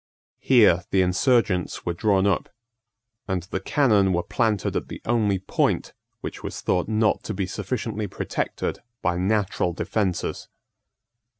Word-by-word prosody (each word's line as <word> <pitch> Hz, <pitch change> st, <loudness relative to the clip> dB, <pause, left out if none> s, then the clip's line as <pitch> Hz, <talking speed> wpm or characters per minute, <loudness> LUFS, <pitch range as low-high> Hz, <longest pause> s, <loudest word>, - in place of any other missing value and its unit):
Here 105 Hz, -9 st, +5 dB
the 95 Hz, -1 st, +3 dB
insurgents 95 Hz, -1 st, +1 dB
were 85 Hz, -, 0 dB
drawn 95 Hz, +2 st, +2 dB
up; 100 Hz, -3 st, +1 dB, 0.8 s
and 95 Hz, -3 st, -1 dB
the 95 Hz, +1 st, -4 dB
cannon 100 Hz, -4 st, +3 dB
were 85 Hz, 0 st, 0 dB
planted 110 Hz, -6 st, 0 dB
at -, -, -2 dB
the -, -, -7 dB
only 110 Hz, -4 st, +2 dB
point 95 Hz, -, 0 dB, 0.3 s
which -, -, -6 dB
was -, -, -5 dB
thought 90 Hz, -, 0 dB
not 110 Hz, 0 st, +2 dB
to 110 Hz, -, -5 dB
be 95 Hz, 0 st, -1 dB
sufficiently 105 Hz, +2 st, -3 dB
protected -, -, -3 dB, 0.2 s
by 85 Hz, 0 st, +1 dB
natural 95 Hz, -2 st, 0 dB
defences. 95 Hz, +1 st, -2 dB
100 Hz, 135 wpm, -24 LUFS, 90-110 Hz, 0.8 s, Here